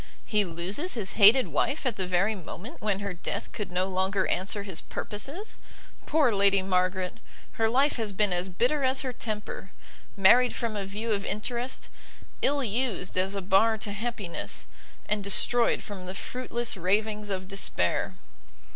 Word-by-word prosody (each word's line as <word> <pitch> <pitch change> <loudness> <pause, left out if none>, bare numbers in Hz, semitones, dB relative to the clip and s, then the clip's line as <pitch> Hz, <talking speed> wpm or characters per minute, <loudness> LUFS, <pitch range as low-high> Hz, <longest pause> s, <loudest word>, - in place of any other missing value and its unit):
he 210 -2 +2
loses 190 - -2
his 210 -4 -2
hated 230 +5 +6
wife 285 0 0
at 250 -5 0
the 190 -2 -2
very 185 +4 +2
moment 205 - -9
when 205 -2 0
her 200 -2 -3
death 175 - -4
could 210 -5 -5
no 180 +1 +1
longer 190 +1 0
answer 200 +3 -1
his 190 -5 -4
purposes! 280 - -4 0.5
Poor 295 -6 +3
Lady 200 -1 +4
Margaret! 185 +1 0 0.3
her 225 -1 +1
life 270 +5 +2
has 220 -3 -1
been 200 -1 +1
as 180 +2 -1
bitter 250 +10 +1
as 260 +1 +2
her 255 -2 -3
temper! 210 -4 -5 0.5
married 240 +6 +6
from 230 -2 -2
a 200 -2 -3
view 215 +4 -4
of 200 -2 0
interest, 240 +5 -3 0.5
ill 280 0 +2
used 225 -4 -1
as 190 +2 +1
a 195 - -3
bar 210 +4 +4
to 205 0 -3
happiness, 210 -4 -3 0.4
and 210 -1 -1
destroyed 235 +4 +3
from 190 -3 -8
the 185 - -5
fruitless 240 +1 -2
ravings 210 +3 0
of 190 -1 -3
despair!" 190 - 0
205 Hz, 165 wpm, -28 LUFS, 190-235 Hz, 0.5 s, hated